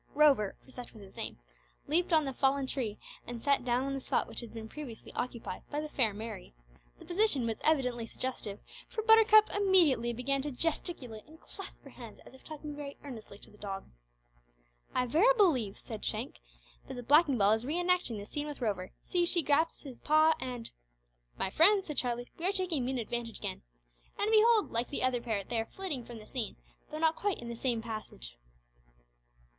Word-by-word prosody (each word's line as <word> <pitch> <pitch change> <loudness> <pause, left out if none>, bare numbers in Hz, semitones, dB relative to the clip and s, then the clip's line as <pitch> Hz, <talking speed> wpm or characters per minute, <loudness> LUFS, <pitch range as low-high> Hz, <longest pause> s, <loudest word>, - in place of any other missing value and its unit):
Rover 280 -9 +4
for 260 - -17
such 245 -1 -9
was 215 -3 -12
his 190 - -15
name - - -5 0.5
leaped 345 +5 +1
on 315 -2 +4
the 270 - -3
fallen 270 +1 +2
tree 240 -6 -2 0.3
and 240 -1 -5
sat 280 +2 +2
down 245 +1 +1
on 275 0 -2
the 270 - -2
spot - - 0
which - - -6
had 235 -2 -8 0.2
previously 250 -3 -9
been - - -1
occupied 240 -6 -6
by 295 - -2
the 305 0 -4
fair 240 -7 +3
Mary. 200 - -8 0.4
The - - -14
position 350 - +2
was 225 -1 -2
evidently 250 -7 +1
suggestive, 220 -6 -5 0.3
for 440 - -3
Buttercup 445 -1 +7
immediately 355 - +4
began 265 +4 0
to 295 - -3
gesticulate 265 -5 -2
and 315 +1 -16
clasp 390 - -11
her 275 - -12
hands 235 -4 -11
as - - -14
if 265 - -16
talking 300 -1 -7
very 285 -1 -7
earnestly 225 -7 -9
to - - -5
the 210 - -19
dog. 195 -1 -5 1.1
"I 250 - +2
verily 395 - +4
believe," 260 - +3
said - - -8
Shank, - - -3 0.5
"that - - -6
the 245 - -6
blacking 290 0 +5
ball 200 -1 +5
is 220 +1 +2
re 300 +7 -1
enacting 355 -10 +1
the 200 - -6
scene 290 +7 -4
with 295 - -6
Rover! 200 -6 -2
See! 350 -1 +1
she 345 -1 +2
grasps 300 +3 +1
his 265 -5 -9
paw, 310 +1 +5
and 245 -3 -5 0.3
" - - -40
"My 190 - -1
friend," 385 - +5
said 300 -3 -6
Charlie, 245 -1 -1
"we 335 - -3
are - - +3
taking 365 -8 +1
mean 260 +1 -1
advantage 235 0 -3
again! 195 -3 -4 0.6
And, 420 +2 +1
behold! 445 -1 +5
like 235 +1 0
the 285 - -2
other 255 -2 +2
pair, 220 -4 -1
they 230 +4 -2
are 225 - -1
flitting 340 -10 -4
from 240 - -9
the 215 - -11
scene, 240 -2 -3 0.3
though 305 - -5
not 320 0 +3
quite 410 -1 -1
in 235 - -8
the 235 - -4
same 235 -2 -1
fashion." 220 - -6
260 Hz, 205 wpm, -31 LUFS, 230-315 Hz, 1.1 s, Buttercup